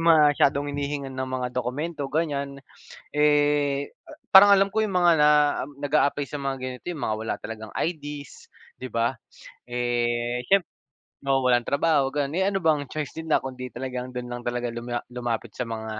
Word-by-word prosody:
masyadong 150 Hz, -3 st, +4 dB
hinihingan 140 Hz, -1 st, -3 dB
ng 130 Hz, 0 st, -4 dB
mga 125 Hz, -1 st, -3 dB
dokumento, 140 Hz, +5 st, -3 dB
ganiyan. 140 Hz, -2 st, -2 dB, 0.6 s
Eh, 145 Hz, -1 st, +2 dB, 0.2 s
a -, -, -15 dB, 0.2 s
parang 200 Hz, +1 st, +9 dB
alam 195 Hz, 0 st, +6 dB
ko 220 Hz, +2 st, 0 dB
'yong 210 Hz, -, -2 dB
mga 175 Hz, -1 st, +4 dB
na 150 Hz, -1 st, +5 dB, 0.3 s
um, 145 Hz, -, -9 dB
nag-aaply 145 Hz, -1 st, +1 dB
sa 150 Hz, -, -7 dB
mga 135 Hz, -1 st, -3 dB
ganito 130 Hz, 0 st, -6 dB
'yong 160 Hz, -, -7 dB
mga 110 Hz, -4 st, -1 dB
wala -, -, -1 dB
talagang 110 Hz, -1 st, -8 dB
IDs, 145 Hz, -4 st, -5 dB, 0.2 s
'di 130 Hz, -3 st, -8 dB
ba. 115 Hz, +3 st, 0 dB, 0.5 s
Eh, 120 Hz, 0 st, -1 dB
siyemp 195 Hz, 0 st, +4 dB, 0.6 s
oo, 135 Hz, -1 st, +1 dB
walang 120 Hz, -1 st, +3 dB
trabaho, 140 Hz, -1 st, +2 dB
gano'n, 145 Hz, -1 st, 0 dB
eh, 190 Hz, -, +2 dB
ano 195 Hz, -3 st, -1 dB
bang 150 Hz, -3 st, +2 dB
choice 150 Hz, +1 st, -4 dB
nila 160 Hz, -1 st, +1 dB
kundi 130 Hz, -1 st, -6 dB
talagang 125 Hz, +1 st, -5 dB
do'n 125 Hz, -, -3 dB
lang 120 Hz, -, -4 dB
talaga 120 Hz, 0 st, -3 dB
luma 120 Hz, +1 st, -4 dB
lumapit 120 Hz, -2 st, -3 dB
sa 125 Hz, -, -4 dB
mga 110 Hz, -1 st, -5 dB
140 Hz, 175 wpm, -25 LUFS, 125-150 Hz, 0.6 s, parang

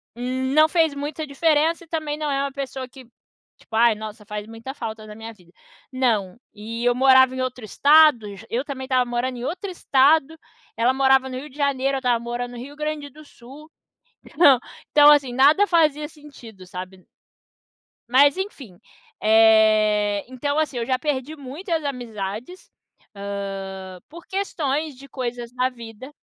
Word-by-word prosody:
hum, 260 Hz, +2 st, -3 dB
não 310 Hz, +1 st, +6 dB
fez 320 Hz, -3 st, +2 dB
muita 295 Hz, +2 st, -5 dB
diferença 315 Hz, +3 st, +1 dB
e -, -, -31 dB
também 310 Hz, -2 st, -3 dB
não 305 Hz, -1 st, -3 dB
é 275 Hz, 0 st, 0 dB
uma 280 Hz, -, -3 dB
pessoa 265 Hz, -2 st, -5 dB
que, 260 Hz, 0 st, -14 dB, 0.5 s
tipo: 225 Hz, -, -11 dB
Ai, 230 Hz, 0 st, +4 dB
nossa, 215 Hz, 0 st, -9 dB
faz 210 Hz, -1 st, -5 dB
muita 225 Hz, +4 st, -8 dB
falta 220 Hz, -4 st, -7 dB
na 210 Hz, -, -10 dB
minha 225 Hz, +1 st, -9 dB
vida. 180 Hz, -5 st, -23 dB, 0.4 s
Não. 225 Hz, -8 st, 0 dB, 0.2 s
E 225 Hz, +3 st, -6 dB
eu 245 Hz, -, +4 dB
morava 260 Hz, 0 st, +5 dB
em 260 Hz, -, -3 dB
outro 255 Hz, -2 st, -4 dB
estado 280 Hz, -4 st, +4 dB
j 205 Hz, +3 st, -13 dB
Eu 245 Hz, +3 st, -1 dB
também 265 Hz, -2 st, -6 dB
estava 255 Hz, -1 st, +1 dB
morando 245 Hz, +1 st, -2 dB
em -, -, -7 dB
outro 360 Hz, +6 st, -4 dB
estado, 310 Hz, -1 st, +2 dB, 0.4 s
ela 240 Hz, +3 st, +2 dB
morava 265 Hz, 0 st, +3 dB
no 255 Hz, -, -5 dB
Rio 295 Hz, +3 st, -10 dB
de 275 Hz, -, -18 dB
Janeiro, 275 Hz, -1 st, 0 dB
eu -, -, -2 dB
estava 245 Hz, -3 st, +1 dB
morando 240 Hz, +1 st, -5 dB
no -, -, -9 dB
Rio 270 Hz, +4 st, -9 dB
Grande 300 Hz, -1 st, -4 dB
do 305 Hz, +3 st, -16 dB
Sul. 285 Hz, +4 st, -15 dB, 0.6 s
Então 285 Hz, -5 st, +5 dB, 0.3 s
então 295 Hz, 0 st, +8 dB
assim, 280 Hz, -4 st, +2 dB
nada 290 Hz, +10 st, +5 dB
fazia 300 Hz, -3 st, +2 dB
sentido, 255 Hz, -, -14 dB
sabe? 185 Hz, +1 st, -9 dB, 1.0 s
Mas, 280 Hz, +5 st, +5 dB
enfim, 275 Hz, -, -7 dB, 0.4 s
eh, 215 Hz, -2 st, +4 dB
então, 285 Hz, +3 st, -3 dB
assim, 310 Hz, -4 st, -1 dB
eu 235 Hz, -, -2 dB
já 255 Hz, +1 st, 0 dB
perdi 290 Hz, +1 st, -3 dB
muitas 315 Hz, +4 st, -4 dB
amizades, 240 Hz, -, -6 dB, 0.4 s
hã, 195 Hz, -2 st, -6 dB
por 340 Hz, +2 st, -13 dB
questões 310 Hz, -7 st, -2 dB
de 275 Hz, +1 st, -15 dB
coisas 245 Hz, -2 st, -5 dB
na 255 Hz, +1 st, 0 dB
vida. 235 Hz, +1 st, -11 dB
260 Hz, 170 wpm, -22 LUFS, 225-295 Hz, 1.0 s, então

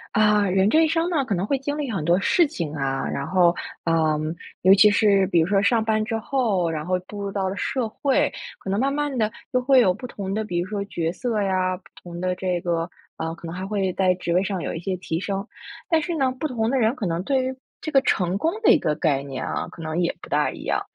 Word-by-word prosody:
啊， 210 Hz, -1 st, +4 dB
人 190 Hz, +2 st, +3 dB
这 315 Hz, -, +5 dB
一 -, -, +1 dB
生 330 Hz, +1 st, +1 dB
呢， 305 Hz, -5 st, +2 dB
可 225 Hz, -6 st, -1 dB
能 180 Hz, +3 st, -1 dB
会 275 Hz, +3 st, 0 dB
经 285 Hz, +2 st, -3 dB
历 285 Hz, -5 st, -3 dB
很 190 Hz, -8 st, -2 dB
多 170 Hz, +4 st, +3 dB
事 335 Hz, -, +3 dB
情， 165 Hz, -, -4 dB
啊， 135 Hz, -1 st, -1 dB
然 140 Hz, -, -3 dB
后， 175 Hz, -2 st, +4 dB, 0.3 s
嗯， 155 Hz, -1 st, +1 dB, 0.3 s
尤 190 Hz, +1 st, +8 dB
其 205 Hz, +2 st, +7 dB
是 200 Hz, -2 st, +3 dB
比 175 Hz, -3 st, +3 dB
如 160 Hz, -, +3 dB
说 195 Hz, 0 st, +3 dB
上 220 Hz, +2 st, +2 dB
班 215 Hz, -1 st, +1 dB
之 225 Hz, +1 st, -2 dB
后， 220 Hz, -7 st, 0 dB
然 155 Hz, -2 st, -3 dB
后 185 Hz, +1 st, 0 dB
步 205 Hz, -1 st, -7 dB
入 200 Hz, 0 st, -3 dB
到 195 Hz, -1 st, -1 dB
了 190 Hz, -, -3 dB
社 240 Hz, +3 st, -1 dB
会， 285 Hz, +6 st, +1 dB, 0.2 s
可 190 Hz, -, -5 dB
能 200 Hz, -, +1 dB
慢 270 Hz, +3 st, +1 dB
慢 290 Hz, -1 st, -1 dB
地 215 Hz, -1 st, +1 dB, 0.2 s
就 255 Hz, -, +3 dB
会 260 Hz, +1 st, +5 dB
有 190 Hz, -7 st, +4 dB
不 240 Hz, +6 st, -8 dB
同 195 Hz, -4 st, -5 dB
的， 220 Hz, +1 st, -1 dB
比 180 Hz, -5 st, -3 dB
如 175 Hz, -, -2 dB
说 200 Hz, 0 st, -3 dB
角 165 Hz, -4 st, -2 dB
色 230 Hz, +3 st, -2 dB
呀， 185 Hz, -1 st, 0 dB
不 185 Hz, -, -24 dB, 0.2 s
同 175 Hz, -1 st, -8 dB
的 180 Hz, 0 st, 0 dB
这 180 Hz, -1 st, -1 dB
个 170 Hz, 0 st, -1 dB, 0.3 s
呃， 160 Hz, 0 st, -3 dB
可 170 Hz, -, -12 dB
能 165 Hz, +1 st, -6 dB
还 190 Hz, +1 st, -5 dB
会 195 Hz, -3 st, -1 dB
在 185 Hz, -1 st, +2 dB
职 175 Hz, -1 st, -2 dB
位 180 Hz, -, +4 dB
上 190 Hz, -3 st, -3 dB
有 -, -, -3 dB
一 -, -, -4 dB
些 185 Hz, +2 st, -3 dB
提 170 Hz, -2 st, -3 dB
升， 195 Hz, 0 st, -3 dB, 0.4 s
但 325 Hz, -3 st, +3 dB
是 340 Hz, +2 st, -3 dB
呢， 265 Hz, -4 st, +1 dB
不 310 Hz, -, -1 dB
同 230 Hz, -4 st, -1 dB
的 270 Hz, -, +2 dB
人 225 Hz, +2 st, +2 dB
可 215 Hz, -, -4 dB
能 170 Hz, 0 st, -1 dB
对 265 Hz, +3 st, +1 dB
于 260 Hz, 0 st, -3 dB, 0.2 s
这 310 Hz, -, -5 dB
个 270 Hz, -, +5 dB
成 180 Hz, -7 st, +1 dB
功 325 Hz, -, +1 dB
的 -, -, +7 dB
一 -, -, +5 dB
个 155 Hz, -, 0 dB
概 150 Hz, -3 st, +1 dB
念 135 Hz, -1 st, -5 dB
啊， -, -, -3 dB
可 165 Hz, -, -10 dB
能 160 Hz, +2 st, -1 dB
也 170 Hz, -, 0 dB
不 -, -, -8 dB
大 -, -, +2 dB
一 -, -, -9 dB
样， -, -, 0 dB
195 Hz, 290 characters per minute, -23 LUFS, 175-245 Hz, 0.4 s, 尤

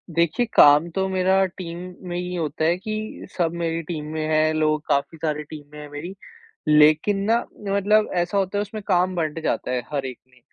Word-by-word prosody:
देखिये, 170 Hz, +8 st, +2 dB
काम 150 Hz, +3 st, +7 dB
तो 190 Hz, +3 st, -1 dB
मेरा 190 Hz, +1 st, +3 dB
टीम 170 Hz, -2 st, -6 dB, 0.3 s
में 175 Hz, -, -3 dB
ये 180 Hz, 0 st, -3 dB
होता 155 Hz, -1 st, -2 dB
है 170 Hz, +2 st, +2 dB
कि 215 Hz, +2 st, -5 dB
सब 165 Hz, -2 st, +1 dB
मेरी 165 Hz, -1 st, -2 dB
टीम 155 Hz, -3 st, -4 dB
में 155 Hz, -, -2 dB
हैं, 155 Hz, 0 st, +2 dB
लोग 155 Hz, -1 st, +1 dB
काफ़ी 140 Hz, +3 st, 0 dB
सारे 150 Hz, -1 st, -2 dB
टीम 150 Hz, -2 st, -8 dB
में 150 Hz, -, -9 dB
हैं 150 Hz, -1 st, -9 dB
मेरी। 155 Hz, +6 st, -7 dB, 0.5 s
लेकिन 155 Hz, +6 st, +5 dB
ना, 225 Hz, +3 st, +3 dB, 0.3 s
मतलब 205 Hz, +2 st, +3 dB
ऐसा 175 Hz, +3 st, -1 dB
होता 195 Hz, +1 st, 0 dB
है, -, -, +1 dB
उसमें 210 Hz, +1 st, -6 dB
काम 180 Hz, +1 st, +2 dB
बँट 160 Hz, -1 st, -2 dB
जाता 125 Hz, -, -1 dB
है 125 Hz, -1 st, 0 dB
हर 140 Hz, -2 st, -2 dB
एक 130 Hz, -2 st, -6 dB
में, 125 Hz, -1 st, -24 dB
165 Hz, 205 wpm, -23 LUFS, 150-190 Hz, 0.5 s, काम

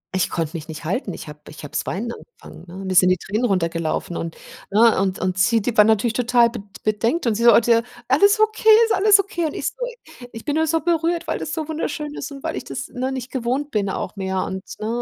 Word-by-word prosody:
Ich 185 Hz, -, +1 dB
konnte 165 Hz, -1 st, -3 dB
mich 155 Hz, -2 st, -6 dB
nicht 160 Hz, 0 st, -8 dB
halten. 195 Hz, -, -2 dB
Ich -, -, -9 dB
habe 150 Hz, 0 st, -10 dB
ich 155 Hz, -, -11 dB
habe 145 Hz, -, -8 dB
das -, -, -3 dB
weinen 230 Hz, +6 st, -3 dB
angefangen, 360 Hz, -, -13 dB
ne? 190 Hz, +3 st, -8 dB
Mir 190 Hz, -, -2 dB
sind 180 Hz, 0 st, +6 dB
die 185 Hz, -, +3 dB
Tränen 215 Hz, +7 st, -2 dB
runtergelaufen 170 Hz, -4 st, -1 dB
und 165 Hz, -1 st, -5 dB, 0.3 s
ne, 220 Hz, +1 st, +4 dB
und 190 Hz, -1 st, 0 dB
und 185 Hz, 0 st, -2 dB
sie 225 Hz, +4 st, +4 dB
die 225 Hz, +2 st, -3 dB
waren 210 Hz, 0 st, +6 dB
natürlich 220 Hz, +1 st, +2 dB
total 240 Hz, -1 st, +3 dB
bed 230 Hz, -4 st, -6 dB, 0.2 s
bedenkt 225 Hz, +9 st, 0 dB
und 230 Hz, -, +2 dB
sie 215 Hz, -, -3 dB
so: 235 Hz, -, +8 dB
„Oh, -, -, +8 dB
d 235 Hz, +1 st, 0 dB
äh, 230 Hz, 0 st, +2 dB, 0.3 s
alles 405 Hz, +11 st, +4 dB
okay, 435 Hz, 0 st, +2 dB, 0.2 s
ist 450 Hz, -, 0 dB
alles 405 Hz, +1 st, +5 dB
okay?“ 375 Hz, -4 st, -2 dB
Und 300 Hz, -, -6 dB
ich -, -, -4 dB
so: -, -, -20 dB, 0.6 s
„Ich 225 Hz, -, -10 dB
bin 290 Hz, -, -1 dB
nur 320 Hz, 0 st, +2 dB
so 325 Hz, +1 st, +1 dB
berührt, 335 Hz, +1 st, 0 dB
weil -, -, -2 dB
das 300 Hz, -, -5 dB
so 315 Hz, -2 st, -3 dB
wunderschön 300 Hz, -2 st, -4 dB
ist -, -, -6 dB
und 275 Hz, -1 st, -10 dB
weil -, -, -3 dB
ich -, -, -5 dB
das, 135 Hz, -1 st, -6 dB
ne, 255 Hz, +2 st, -3 dB
nicht 255 Hz, -1 st, -5 dB
gewohnt 260 Hz, +3 st, -2 dB
bin 205 Hz, -4 st, 0 dB
auch 190 Hz, -, -4 dB
mehr“ 190 Hz, -1 st, -2 dB
und, 190 Hz, 0 st, -5 dB, 0.2 s
ne, 215 Hz, -, -4 dB
230 Hz, 260 wpm, -21 LUFS, 190-295 Hz, 0.6 s, so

